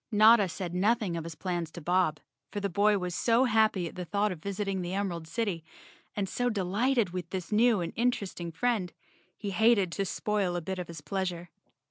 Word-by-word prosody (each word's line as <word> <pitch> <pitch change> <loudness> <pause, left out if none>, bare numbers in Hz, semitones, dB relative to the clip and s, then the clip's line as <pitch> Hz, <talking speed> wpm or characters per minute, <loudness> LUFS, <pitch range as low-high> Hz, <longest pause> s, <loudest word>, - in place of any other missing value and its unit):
Notta 215 -1 +6
said 175 0 -5
nothing 205 0 +1
of 165 -1 -4
his 165 -1 -7
plans 175 -3 -3
to - - -7
Bob, 170 -2 +1 0.3
for 205 - -4
the 200 0 -1
boy 205 +3 +3
was 180 -2 -3
so 230 +7 +3
happy 220 -7 +2
at - - -9
the 180 - -5
thought 205 +3 0
of 170 -4 -7
visiting 195 0 -2
the 180 +1 -3
Emerald 175 -5 -2
City, 200 -4 -2 0.5
and 200 -2 -1
so 245 +5 0
delighted 215 +2 +1
with 180 -1 -5
this 185 -1 -5
new 220 -1 +4
and 170 - -4
interesting 200 -8 -1
friend, 195 0 -1 0.4
he 205 -2 -4
hated 210 -2 +3
to 195 +3 -1
spoil 195 -2 -1
a - - 0
bit 190 +3 -4
of 180 - -4
his 165 -2 -8
pleasure. 180 -2 -3
190 Hz, 200 wpm, -29 LUFS, 175-215 Hz, 0.5 s, Notta